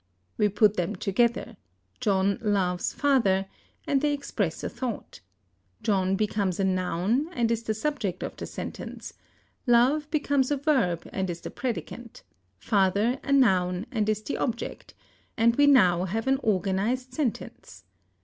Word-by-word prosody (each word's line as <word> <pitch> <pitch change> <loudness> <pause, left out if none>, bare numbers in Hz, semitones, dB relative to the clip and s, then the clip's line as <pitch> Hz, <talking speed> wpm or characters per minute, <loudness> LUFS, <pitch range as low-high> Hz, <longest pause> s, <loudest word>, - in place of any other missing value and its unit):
We 210 - +2
put 205 +1 +3
them 175 -2 -1
together, 230 +4 0 0.4
John 195 0 +1
loves 190 -5 0
father, 230 -10 +2 0.4
and 275 -2 +1
they 295 0 +2
express 210 - -3
a - - -1
thought; 250 -4 -6 0.6
John 190 -2 +1
becomes 200 -3 -1
a - - +2
noun, 190 - 0
and 235 -7 +1
is 230 -1 0
the 220 -1 -2
subject 220 - -2
of - - -5
the - - -6
sentence; - - -7 0.5
love 260 +6 +3
becomes 285 -4 +1
a 290 - +1
verb, 255 - +1
and 190 -1 -2
is 170 -1 -5
the - - -7
predicant; 240 -2 -5 0.3
father 200 - +1
a - - -4
noun, 190 -8 +3
and 215 -4 0
is 215 0 -1
the - - -3
object; 235 -2 -4 0.4
and 230 0 +4
we 285 +2 +5
now 185 -10 +5
have 215 +5 -2
an 265 0 +2
organized 215 +5 0
sentence. 260 -5 -4
215 Hz, 150 wpm, -27 LUFS, 190-255 Hz, 0.6 s, we